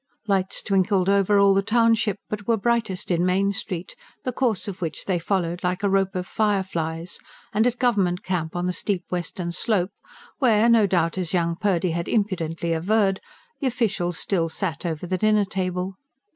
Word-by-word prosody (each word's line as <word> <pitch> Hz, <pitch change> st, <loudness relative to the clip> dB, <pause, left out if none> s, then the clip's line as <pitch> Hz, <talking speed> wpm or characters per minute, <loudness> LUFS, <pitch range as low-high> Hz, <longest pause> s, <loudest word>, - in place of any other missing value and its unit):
Lights 195 Hz, -2 st, 0 dB
twinkled 195 Hz, -1 st, +2 dB
over 200 Hz, +1 st, +3 dB
all 200 Hz, 0 st, +6 dB
the 195 Hz, -, +3 dB
township, 225 Hz, -1 st, +2 dB
but 210 Hz, -1 st, -5 dB
were 230 Hz, -1 st, +3 dB
brightest 220 Hz, -4 st, -1 dB
in 175 Hz, 0 st, +2 dB
Main 190 Hz, +2 st, +2 dB
Street, 185 Hz, -3 st, -3 dB, 0.3 s
the 255 Hz, -, -1 dB
course 235 Hz, -5 st, 0 dB
of 190 Hz, -2 st, -6 dB
which 165 Hz, -3 st, -4 dB
they 185 Hz, -3 st, 0 dB
followed 175 Hz, -1 st, -1 dB
like 180 Hz, +2 st, -1 dB
a 200 Hz, -, +3 dB
rope 195 Hz, 0 st, +1 dB
of 180 Hz, 0 st, -2 dB
fireflies, 180 Hz, -6 st, -1 dB, 0.3 s
and 220 Hz, +3 st, +3 dB
at 245 Hz, -, +2 dB
the -, -, -27 dB
Government 200 Hz, -8 st, +1 dB
Camp 170 Hz, -4 st, -2 dB
on 175 Hz, 0 st, -1 dB
the 180 Hz, -, 0 dB
steep 190 Hz, -1 st, -2 dB
western 175 Hz, 0 st, -3 dB
slope, 195 Hz, 0 st, 0 dB, 0.5 s
where 230 Hz, -4 st, +4 dB
no 225 Hz, -3 st, +5 dB
doubt, 175 Hz, -1 st, +1 dB
as 175 Hz, -4 st, -2 dB
young 170 Hz, -1 st, +1 dB
Purdy 185 Hz, -2 st, +1 dB
had 170 Hz, +1 st, -2 dB
impudently 170 Hz, -6 st, -1 dB
averred, 195 Hz, +3 st, +1 dB, 0.4 s
the 275 Hz, -, 0 dB
officials 210 Hz, -8 st, -1 dB
still 170 Hz, -4 st, 0 dB
sat 175 Hz, 0 st, -3 dB
over 160 Hz, +1 st, -3 dB
the 185 Hz, +1 st, -2 dB
dinner 215 Hz, 0 st, +3 dB
table. 185 Hz, 0 st, -2 dB
190 Hz, 185 wpm, -24 LUFS, 175-210 Hz, 0.5 s, all